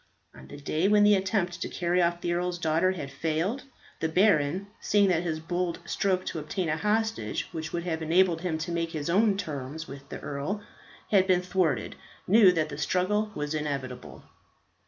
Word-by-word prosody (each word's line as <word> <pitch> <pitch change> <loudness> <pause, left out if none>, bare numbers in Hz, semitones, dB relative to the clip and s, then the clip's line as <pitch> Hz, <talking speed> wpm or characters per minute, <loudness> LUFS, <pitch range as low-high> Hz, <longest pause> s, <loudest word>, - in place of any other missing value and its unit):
On - - -13
the 145 - -10
day 155 +5 0
when 210 0 +5
the 205 0 +6
attempt 190 -3 0
to - - -2
carry 175 0 +1
off 170 0 +1
the 175 - 0
earl's 180 0 -1
daughter 170 +2 +2
had 145 -7 -6
failed, 165 - -2 0.3
the 160 - 0
baron, 180 -1 +3
seeing 205 -1 +3
that 170 -2 +2
his 160 -3 -2
bold 175 +1 -2
stroke 185 +1 0
to 160 - -3
obtain 165 +3 -3
a 155 - +1
hostage 220 +6 -1
which 160 0 -5
would 170 -1 -3
have 165 -2 -2
enabled 170 +1 +3
him 175 -3 -1
to 165 +2 -4
make 165 0 -2
his 155 +1 -2
own 205 +1 +3
terms 155 -3 -5
with 140 0 -10
the - - -6
earl, 165 +9 -4 0.5
had 190 -2 +4
been 180 -1 +3
thwarted, 180 -7 0 0.3
knew 205 -1 +7
that 160 -3 0
the 140 0 -7
struggle 205 +7 0
was 150 +1 -3
inevitable. 130 - -4
175 Hz, 190 wpm, -28 LUFS, 155-190 Hz, 0.5 s, knew